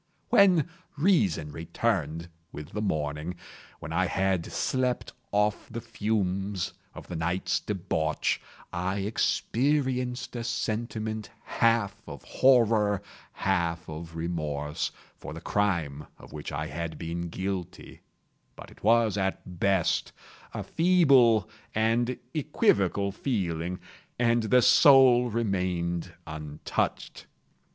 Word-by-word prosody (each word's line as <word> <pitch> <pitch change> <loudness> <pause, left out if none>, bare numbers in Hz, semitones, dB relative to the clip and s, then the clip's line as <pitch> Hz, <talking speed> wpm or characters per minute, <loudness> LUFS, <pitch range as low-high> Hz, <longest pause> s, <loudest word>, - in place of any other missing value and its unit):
When 185 -6 +5 0.3
reason 105 - +2
returned 85 -1 -2 0.2
with 75 +1 -8
the 105 - -4
morning—when 80 -1 -5
I 95 +2 +2
had 95 -3 0
slept 125 -1 -1 0.2
off 105 0 +1
the 115 - -5
fumes 100 -4 -2 0.2
of - - -10
the 90 - -6
night's 90 +3 0
debauch—I 90 0 -2
experienced 125 +3 0
a 120 - -3
sentiment 110 -2 -3
half 115 -4 +1
of - - -9
horror, 110 -6 +3 0.3
half 85 -4 -1
of 80 +1 -8
remorse, 75 -2 -2 0.3
for - - -8
the - - -6
crime 85 -8 -1
of - - -14
which 75 -1 -6
I 75 +2 -3
had 80 +2 -5
been 85 +1 -4
guilty; 95 0 -5 0.5
but - - -11
it - - -19
was, 110 -1 +3
at 95 -2 -3
best, 95 -3 +1 0.4
a - - -4
feeble 140 - +4 0.3
and 115 +3 +1 0.2
equivocal 100 - +1
feeling, 90 - -2 0.4
and 120 -1 +3
the 125 +3 +4
soul 130 -3 +7
remained 90 -6 -1
untouched. 75 -1 -4
100 Hz, 105 wpm, -28 LUFS, 85-115 Hz, 0.5 s, soul